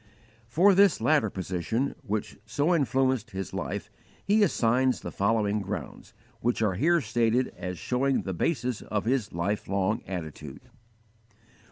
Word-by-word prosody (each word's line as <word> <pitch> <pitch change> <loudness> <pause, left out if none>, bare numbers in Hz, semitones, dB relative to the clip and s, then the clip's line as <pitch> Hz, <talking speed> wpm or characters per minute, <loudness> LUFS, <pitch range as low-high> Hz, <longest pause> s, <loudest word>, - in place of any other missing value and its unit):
For 175 +12 +5
this 200 +1 +5
latter 150 -9 +3
position, 95 +8 -2
which 105 0 -3
so 145 +10 +1
influenced 130 -6 +1
his 95 -1 -6
life, - - -4 0.3
he 210 +2 +3
assigns 130 - +2
the - - -6
following 105 0 +1
grounds, 100 +2 -7 0.2
which 120 -1 0
are 105 -3 +2
here 165 - +3
stated 115 +2 +1
as 90 -1 -5
showing 130 +5 0
the 95 - -3
basis 125 - -1
of 105 -1 -3
his 120 -3 0
life 95 +5 -2
long 100 +2 0
attitude: 80 -6 -6
1. 125 - -25
115 Hz, 145 wpm, -27 LUFS, 100-135 Hz, 0.3 s, For